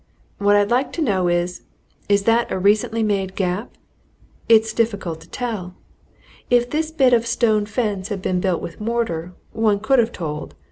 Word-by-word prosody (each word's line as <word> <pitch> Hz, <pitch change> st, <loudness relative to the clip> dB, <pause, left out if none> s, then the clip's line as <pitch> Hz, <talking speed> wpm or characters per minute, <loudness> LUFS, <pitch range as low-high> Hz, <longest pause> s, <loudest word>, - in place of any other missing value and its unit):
What 205 Hz, 0 st, +4 dB
I'd 205 Hz, +1 st, +2 dB
like 255 Hz, +3 st, +1 dB
to 335 Hz, -, -3 dB
know 190 Hz, -8 st, +1 dB
is 175 Hz, +1 st, -1 dB, 0.5 s
is 200 Hz, 0 st, +3 dB
that 230 Hz, +2 st, +2 dB
a -, -, -1 dB
recently 210 Hz, +3 st, +2 dB
made 195 Hz, -3 st, -1 dB
gap? 190 Hz, +4 st, -2 dB, 0.7 s
It's 220 Hz, -1 st, +5 dB
difficult 205 Hz, -8 st, -1 dB
to 165 Hz, -, -16 dB
tell. 205 Hz, -7 st, -4 dB, 0.7 s
If 245 Hz, 0 st, +2 dB
this 315 Hz, +1 st, -1 dB
bit 270 Hz, -6 st, +3 dB
of 235 Hz, -, +5 dB
a -, -, -5 dB
stone 220 Hz, -3 st, +1 dB
fence 205 Hz, -4 st, -2 dB
had 205 Hz, -2 st, -3 dB
been 185 Hz, -1 st, -1 dB
built 185 Hz, -3 st, 0 dB
with 170 Hz, -, -8 dB
mortar, 210 Hz, -7 st, -2 dB, 0.2 s
one 215 Hz, -2 st, +1 dB
could 265 Hz, +5 st, +3 dB
have 235 Hz, 0 st, +2 dB
told. 150 Hz, -6 st, -6 dB
210 Hz, 180 wpm, -21 LUFS, 185-235 Hz, 0.7 s, It's